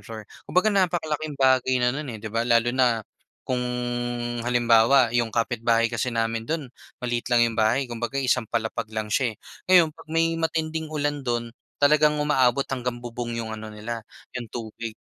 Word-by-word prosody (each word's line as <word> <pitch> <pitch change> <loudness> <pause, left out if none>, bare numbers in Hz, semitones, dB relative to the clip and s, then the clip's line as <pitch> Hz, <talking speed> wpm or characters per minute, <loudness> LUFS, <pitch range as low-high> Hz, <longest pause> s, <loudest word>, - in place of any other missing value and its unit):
floor. 110 -1 -7 0.3
Kumbaga 205 +4 +3
napakalaking 155 -6 0
bagay 130 -1 +3
na 125 0 +2
non, 145 +1 -5
eh, 115 - -5
'di 110 0 -8
ba? 115 - +1
Lalo 120 0 +3
na 120 -4 +2 0.4
kung, 125 -1 0 0.8
halimbawa 120 +1 +4
'yong 115 -1 0
kapitbahay 115 0 +1
kasi 115 +1 -2
namin 115 0 -1
do'n 155 +1 -3 0.3
maliit 120 0 -2
lang 120 - +5
'yong 115 - -7
bahay 115 +4 +2
kumbaga 120 +3 -3
isang 125 -2 +1
palapag 110 0 -3
lang 110 -1 -3
siya, 120 +2 +1
eh. 105 - -18 0.4
Ngayon 175 -3 +7
'pag - - -14
may 165 0 +2
matinding 160 0 -1
ulan 145 -2 -2
do'n 120 -1 -1 0.3
talagang 150 +1 +4
umaabot 135 -3 +2
hanggang 125 -2 -3
bubong 120 0 -5
'yong 115 - -5
ano 110 0 -8
nila 110 +1 -6 0.3
'yong 120 -3 -7
tubig. 115 -1 -6
120 Hz, 170 wpm, -25 LUFS, 115-140 Hz, 0.8 s, Ngayon